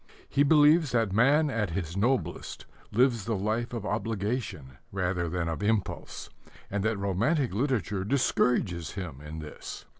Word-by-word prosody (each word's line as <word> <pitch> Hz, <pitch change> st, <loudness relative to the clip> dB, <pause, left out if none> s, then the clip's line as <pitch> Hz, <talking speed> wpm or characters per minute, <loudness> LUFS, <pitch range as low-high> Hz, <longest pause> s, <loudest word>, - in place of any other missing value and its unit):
He 140 Hz, -, +1 dB
believes 150 Hz, 0 st, +5 dB
that 115 Hz, -5 st, +1 dB
man 140 Hz, +7 st, +4 dB
at 105 Hz, -6 st, -1 dB
his 85 Hz, 0 st, -4 dB
noblest 120 Hz, +6 st, -1 dB, 0.3 s
lives 120 Hz, -3 st, +2 dB
the 115 Hz, -, 0 dB
life 110 Hz, +4 st, -1 dB
of 115 Hz, -4 st, -4 dB
obligation 105 Hz, -, -3 dB
rather 90 Hz, -3 st, -1 dB
than 90 Hz, 0 st, -2 dB
of 80 Hz, +3 st, -3 dB
impulse; 105 Hz, -1 st, -2 dB, 0.4 s
and 100 Hz, 0 st, -1 dB
that 110 Hz, -1 st, +1 dB
romantic 115 Hz, -, +1 dB
literature 105 Hz, -, 0 dB
discourages 100 Hz, -, +1 dB
him 85 Hz, -8 st, -6 dB
in 75 Hz, +1 st, -7 dB
this. 75 Hz, -1 st, -8 dB
105 Hz, 145 wpm, -28 LUFS, 90-125 Hz, 0.4 s, believes